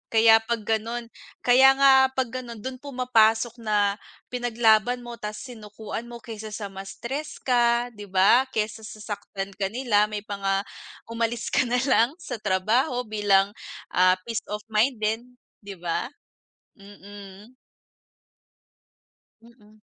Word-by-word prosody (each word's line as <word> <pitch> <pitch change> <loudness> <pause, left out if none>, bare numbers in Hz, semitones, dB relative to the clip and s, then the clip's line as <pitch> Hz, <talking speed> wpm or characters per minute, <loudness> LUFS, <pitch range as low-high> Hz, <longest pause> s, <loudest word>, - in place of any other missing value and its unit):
Kaya 225 0 +7
pag 225 0 -3
gano'n, 230 +2 -2 0.3
kaya 265 +2 +6
nga 275 0 +6 0.2
pag 260 -3 -1
ganun 235 -3 -7
dun 260 +2 -6
pumapasok 240 -4 +2
na 205 -2 +1 0.3
pinaglaban 240 -1 +2
mo, 240 -1 -8
ta's 210 -1 -6
sinukuan 220 -2 -8
mo. 235 -1 -10
Kaysa 220 -2 -8
sa 205 -2 -5
mas 195 0 -8
stress 285 +5 -6
ka, 240 -1 +2
'di 205 -2 -10
ba? 195 +7 +4
Kaysa 215 0 -3
sasaktan 205 -2 -6
ka 195 - -1
nila 215 -1 +2
may 210 -1 -5
mga 195 -2 -1 0.5
umalis 230 0 -2
ka - - +2
na 245 +1 0
lang 250 +2 +3
sa 245 - -5
trabaho 215 +7 +1
bilang, 205 -3 +2 0.4
ah, 185 0 +5
peace 230 +1 -4
of 210 0 -4
mind 220 +2 +1
din, 220 +3 -1 0.4
'di 200 - -7
ba? 170 -2 -2 0.7
Mm. 200 +3 -13 1.9
Mm. 215 -2 -21
225 Hz, 130 wpm, -25 LUFS, 210-240 Hz, 1.9 s, Kaya